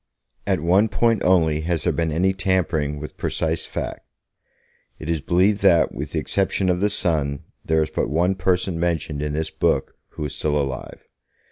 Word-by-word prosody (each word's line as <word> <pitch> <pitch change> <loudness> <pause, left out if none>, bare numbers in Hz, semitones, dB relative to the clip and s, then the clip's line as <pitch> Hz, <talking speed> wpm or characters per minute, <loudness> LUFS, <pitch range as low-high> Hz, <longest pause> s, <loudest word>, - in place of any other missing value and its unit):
At - - +1
one 95 +7 +3
point 115 +1 +2
only 80 -4 +3
has 85 0 -1
there - - +1
been 80 -1 -1
any 95 +5 +2
tampering 90 -6 0
with 75 - -8
precise 80 0 -1
fact. - - -5 0.9
It 80 +1 -4
is 80 -3 -1
believed 95 +7 +2
that, 85 -6 +4
with 75 +3 -6
the 80 - +1
exception 95 +2 0
of 90 - 0
the 105 +2 +2
Son, 75 -8 -1 0.2
there 80 0 +2
is 75 - -6
but - - -1
one 85 +6 +2
person 90 -2 0
mentioned 80 -3 -1
in 75 0 -2
this 80 +1 -2
book - - 0 0.2
who 75 - -4
is 75 - -4
still 75 -1 0
alive. 65 -2 -5
85 Hz, 180 wpm, -22 LUFS, 75-95 Hz, 0.9 s, that